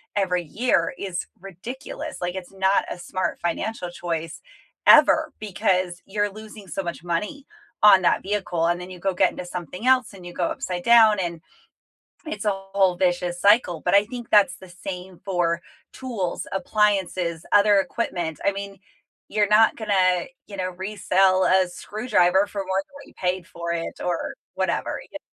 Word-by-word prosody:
every 180 -3 +1
year 230 - 0
is 185 -3 -4
ridiculous. 245 - -8
Like, 175 +1 -2
it's 185 -2 -7
not 190 0 +2
a - - -6
smart 185 +1 -3
financial 180 +2 -3
choice, 165 -2 -4 0.5
ever, 315 -1 +6
because 185 -4 -1
you're 205 +1 -1
losing 215 0 -11
so 190 +3 -4
much 170 -1 -6
money 210 - -3 0.4
on 200 -3 +7
that - - +3
vehicle, 190 -4 -1
and 175 +1 +1
then 180 +1 -8
you 180 - -10
go 195 +2 -1
get - - +3
into - - -7
something 180 - -6
else, 255 -4 +3
and 185 -3 -12
you 175 - -7
go 175 - -1
upside 175 +1 -3
down, 220 -2 +6
and 170 -3 -3 0.8
it's 210 -9 -5
a - - +4
whole 195 -1 +1
vicious 175 -1 0
cycle, 200 -5 +3
but - - +2
I 200 +1 +5
think 240 +1 -8
that's 200 -4 +5
the 190 - -13
same 180 0 -8
for 175 -3 0 0.3
tools, 225 -9 -4
appliances, 190 -4 0
other 205 0 +5
equipment, 175 -6 -3
I 200 - +3
mean, 200 0 -7 0.5
you're 210 -1 +2
not 215 +2 +5
gonna, 185 -5 +1 0.2
you 200 - -9
know, 185 -1 -2
resell 190 0 +2
a 185 0 +4
screwdriver 195 -1 +1
for 200 -1 -5
more 190 +1 0
than 280 - -34
what 280 - -12
you - - -18
paid 180 -1 -2
for 170 0 -5
it, 170 -1 -4
or 175 -2 -2 0.2
whatever, - - -1
y - - -6
190 Hz, 170 wpm, -24 LUFS, 175-210 Hz, 0.8 s, on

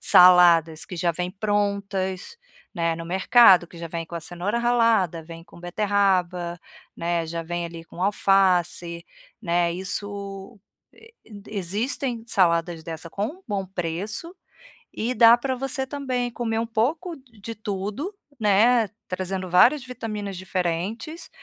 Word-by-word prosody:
saladas 170 -3 +6
que 180 - -8
já 170 0 +1
vêm 180 +2 -3
prontas, 200 - -2 0.4
né, 165 -1 0
no 165 - -7
mercado, 190 0 +6
que - - -14
já 170 - -5
vêm 165 0 -5
com 170 - -10
a - - -5
cenoura 180 +7 -3
ralada, 230 -8 +2
vêm 165 +1 -11
com 170 0 -16
beterraba, 180 -2 0 0.4
né, 170 -1 -1
já 165 +1 -4
vêm 175 +1 -4
ali 165 -1 -9
com 175 - -8
alface, 180 -4 +2 0.4
né. 175 -3 +1
Isso, 195 +3 -5 0.3
e 450 +1 -18 0.4
existem 225 +5 -2
saladas 170 -5 +1
dessa 165 +1 -7
com 205 +5 -2
um 360 +8 -9
bom 200 -2 -2
preço 195 - -4 0.6
e 240 +3 -2
dá 235 -1 +7
pra 260 +2 -2
você 270 +1 -2
também 255 -3 -3
comer 230 -2 -2
um 230 - -1
pouco 310 +10 -1
de 230 -4 -10
tudo, 210 - -5 0.2
né, 220 +3 +4 0.2
trazendo 185 0 -4
várias 245 - +5
vitaminas 215 -6 -6
diferentes, 190 - -3
195 Hz, 135 wpm, -24 LUFS, 175-230 Hz, 0.6 s, dá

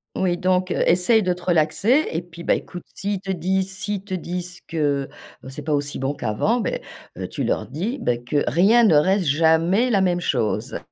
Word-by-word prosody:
Oui, 180 -2 0
donc 185 +1 +1
essaye 185 +7 +3
de 180 -1 +1
te 180 - -12
relaxer 185 - +2
et 165 +1 -2
puis, 170 0 -12
bah, - - +2
écoute 175 - -5
s'ils 200 0 -3
te 195 0 -5
disent 190 +2 -1
s'ils 205 -1 -3
te 195 -2 -7
disent 180 0 -5
que 145 -4 -1 0.4
c'est 135 - -8
pas 155 - -1
aussi 145 0 -1
bon 135 +2 -2
qu'avant, 145 - 0
bah, 215 - -1 0.5
heu - - -4
tu - - -4
leur - - -1
dis: 180 - -4
«Bah, 120 -1 0
que 120 +5 -1
rien 200 - +4
ne 180 -9 +5
reste 185 +5 +3
jamais 165 - +3
la 200 -5 +3
même 175 -1 +1
chose», 120 -9 -1
180 Hz, 200 wpm, -22 LUFS, 155-195 Hz, 0.5 s, ne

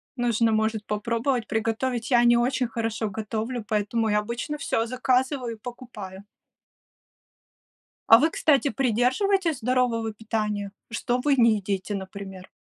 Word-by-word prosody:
Нужно, 235 -2 +1
может, 220 -1 0
попробовать 230 +3 -1
приготовить. 225 +2 -1
Я 240 -1 +5
не 240 0 +5
очень 250 0 +1
хорошо 225 -1 -2
готовлю, 220 +3 -4
поэтому 220 +1 0
я 210 0 +3
обычно 240 +7 -4
всё 225 -5 -1
заказываю 255 0 0
и 215 - -22
покупаю. 215 -6 -9 1.9
А 225 - +10
вы, 315 - +3
кстати, 290 -3 +2
придерживаетесь 275 - +1
здорового 235 -2 0
питания? 210 -2 -3 0.2
Что 240 +2 -1
вы 285 +2 +2
не 230 -4 +4
едите, 195 +1 -3
например? 190 -1 -7
230 Hz, 130 wpm, -25 LUFS, 215-250 Hz, 1.9 s, А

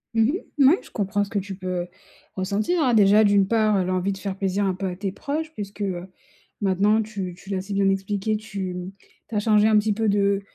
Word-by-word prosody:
Mmh 225 - +4 0.4
mh. 275 - +5
Mouais, 315 +8 +6
je - - -16
comprends 205 0 0
ce 200 - -7
que 205 -2 -1
tu 195 0 -6
peux, 180 -1 -3 0.5
ressentir. 215 - 0
Déjà, 210 +1 +6
d'une 200 -2 +4
part, 215 -2 +2
heu, 185 - +2
l'envie 185 +1 0
de 195 - -5
faire 195 -1 -4
plaisir 195 +1 0
un 190 - +1
peu 190 +1 -3
à 180 - -4
tes 195 0 -3
proches 305 +9 -4
puisque, 205 -3 -7
heu, 185 -2 -3 0.5
maintenant 205 +3 +3
tu 200 -4 -5
tu 195 - -14
l'as 190 -1 -1
si 200 +2 -6
bien 195 0 +2
expliqué, 195 +2 -1
tu 195 -4 -5 0.5
tu 225 - -6
as - - +3
changé 210 0 +4
un 215 -1 +5
petit 210 0 +2
peu 220 0 0
de 200 0 +2
200 Hz, 230 wpm, -24 LUFS, 190-215 Hz, 0.5 s, Mouais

